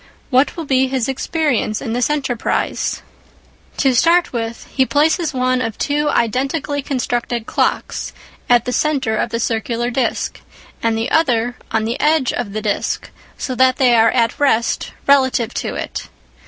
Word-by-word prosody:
What 260 Hz, +6 st, +3 dB
will 330 Hz, -, -4 dB
be 265 Hz, -1 st, +2 dB
his 260 Hz, -2 st, -1 dB
experience 270 Hz, -5 st, -1 dB
in 225 Hz, -4 st, -4 dB
this 245 Hz, +3 st, +1 dB
enterprise? 265 Hz, -6 st, -1 dB, 0.7 s
To 270 Hz, -3 st, +3 dB
start 340 Hz, +7 st, +3 dB
with, 230 Hz, -1 st, -4 dB
he 265 Hz, -, +3 dB
places 310 Hz, +4 st, +2 dB
one 255 Hz, -1 st, +1 dB
of 225 Hz, -3 st, -3 dB
two 295 Hz, +1 st, 0 dB
identically 270 Hz, +5 st, 0 dB
constructed 240 Hz, -4 st, -2 dB
clocks -, -, -1 dB, 0.4 s
at 240 Hz, -1 st, +4 dB
the 250 Hz, -, -2 dB
centre 270 Hz, -8 st, +1 dB
of -, -, -1 dB
the 230 Hz, -, -2 dB
circular 235 Hz, +1 st, -1 dB
disc, 245 Hz, -2 st, -1 dB, 0.4 s
and 225 Hz, -1 st, +1 dB
the 225 Hz, +2 st, -2 dB
other 245 Hz, -6 st, +2 dB
on 220 Hz, -1 st, 0 dB
the 230 Hz, +3 st, -2 dB
edge 300 Hz, -4 st, +2 dB
of 235 Hz, -5 st, -3 dB
the 215 Hz, 0 st, -3 dB
disc, 210 Hz, -2 st, -2 dB, 0.3 s
so 260 Hz, -, -3 dB
that 255 Hz, +1 st, +4 dB
they 255 Hz, -3 st, +4 dB
are 225 Hz, -1 st, +5 dB
at 235 Hz, +2 st, +1 dB
rest 235 Hz, -5 st, +1 dB
relative 260 Hz, -4 st, +3 dB
to -, -, -3 dB
it. -, -, -5 dB
255 Hz, 160 wpm, -18 LUFS, 230-280 Hz, 0.7 s, are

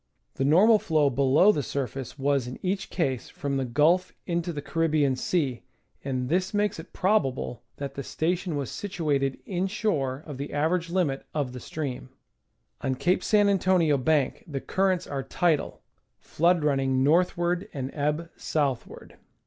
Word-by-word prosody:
The -, -, -2 dB
normal 205 Hz, +10 st, +6 dB
flow 150 Hz, -6 st, +2 dB
below 140 Hz, +9 st, +5 dB
the 150 Hz, -, -1 dB
surface 135 Hz, 0 st, -4 dB
was 140 Hz, -2 st, +1 dB
in 125 Hz, -, -6 dB
each 190 Hz, +1 st, -1 dB
case 135 Hz, -8 st, -2 dB
from 140 Hz, -6 st, -3 dB
the 135 Hz, -, -1 dB
Qulf 165 Hz, +9 st, +2 dB
into 170 Hz, 0 st, -1 dB
the 150 Hz, -, -5 dB
Caribbean 155 Hz, -3 st, +1 dB
Sea, 135 Hz, -4 st, -1 dB, 0.4 s
and 130 Hz, -2 st, -2 dB
this 185 Hz, +6 st, 0 dB
makes 205 Hz, -4 st, 0 dB
it 160 Hz, -, -10 dB
probable 135 Hz, -, 0 dB, 0.2 s
that 140 Hz, -1 st, -5 dB
the 140 Hz, -, -5 dB
station 170 Hz, +3 st, -1 dB
was 140 Hz, -2 st, -3 dB
situated 150 Hz, -9 st, -1 dB
inshore 180 Hz, -, -1 dB
of 145 Hz, -4 st, -8 dB
the 140 Hz, -, -5 dB
average 165 Hz, +4 st, 0 dB
limit 170 Hz, -7 st, -1 dB
of 140 Hz, -5 st, -1 dB
the 125 Hz, -, -6 dB
stream. 135 Hz, -3 st, -5 dB, 0.7 s
On 130 Hz, -, -1 dB
Cape 180 Hz, +8 st, +1 dB
San 205 Hz, -1 st, +4 dB
Antonio 185 Hz, -5 st, +3 dB
Bank 140 Hz, 0 st, +1 dB
the 140 Hz, -4 st, -3 dB
currents 185 Hz, +3 st, 0 dB
are 140 Hz, -1 st, -3 dB
tidal, 165 Hz, +2 st, 0 dB, 0.3 s
flood 170 Hz, 0 st, +1 dB
running 135 Hz, -3 st, +2 dB
northward 175 Hz, +4 st, +2 dB
and 135 Hz, -1 st, -4 dB
ebb 150 Hz, +3 st, -1 dB
southward. 140 Hz, -6 st, -3 dB
150 Hz, 155 wpm, -27 LUFS, 135-180 Hz, 0.7 s, normal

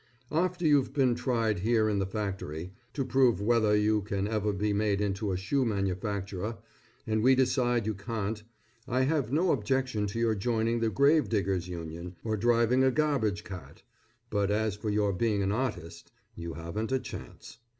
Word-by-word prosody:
After 175 Hz, +2 st, 0 dB
you've 140 Hz, -4 st, +3 dB
been 130 Hz, -4 st, +3 dB
tried 115 Hz, -4 st, 0 dB
here 110 Hz, +2 st, +2 dB
in 105 Hz, -2 st, +1 dB
the 95 Hz, -, 0 dB
factory, 95 Hz, -4 st, -4 dB, 0.2 s
to 135 Hz, -3 st, -1 dB
prove 130 Hz, -6 st, +3 dB
whether 110 Hz, 0 st, +3 dB
you 105 Hz, 0 st, +2 dB
can 100 Hz, 0 st, -2 dB
ever 105 Hz, -1 st, 0 dB
be 105 Hz, +1 st, 0 dB
made 100 Hz, -1 st, +1 dB
into 100 Hz, 0 st, -1 dB
a 90 Hz, -, -1 dB
shoe 130 Hz, +9 st, 0 dB
manufacturer, 100 Hz, 0 st, -2 dB, 0.5 s
and 110 Hz, 0 st, 0 dB
we 130 Hz, +3 st, +5 dB
decide 120 Hz, -3 st, +2 dB
you 110 Hz, -, 0 dB
can't; 105 Hz, +1 st, -4 dB, 0.5 s
I 130 Hz, 0 st, +1 dB
have 135 Hz, -3 st, +1 dB
no 165 Hz, +5 st, +3 dB
objection 125 Hz, -3 st, 0 dB
to 100 Hz, -, -5 dB
your 115 Hz, -1 st, +2 dB
joining 115 Hz, +2 st, 0 dB
the 115 Hz, -1 st, +1 dB
grave 140 Hz, +3 st, +3 dB
diggers 95 Hz, -4 st, 0 dB
union, 85 Hz, 0 st, -7 dB
or 110 Hz, -1 st, -1 dB
driving 120 Hz, +3 st, +3 dB
a 130 Hz, -, +5 dB
garbage 130 Hz, -8 st, 0 dB
cart, 90 Hz, -2 st, -10 dB, 0.5 s
but 100 Hz, -2 st, +1 dB
as 105 Hz, 0 st, 0 dB
for 105 Hz, +1 st, -4 dB
your 105 Hz, -1 st, +1 dB
being 105 Hz, 0 st, +1 dB
an 95 Hz, -, 0 dB
artist, 105 Hz, -8 st, -4 dB, 0.2 s
you 85 Hz, -2 st, -6 dB
haven't 85 Hz, -, -4 dB
a 130 Hz, -, +3 dB
chance. -, -, -9 dB
110 Hz, 175 wpm, -29 LUFS, 100-125 Hz, 0.5 s, we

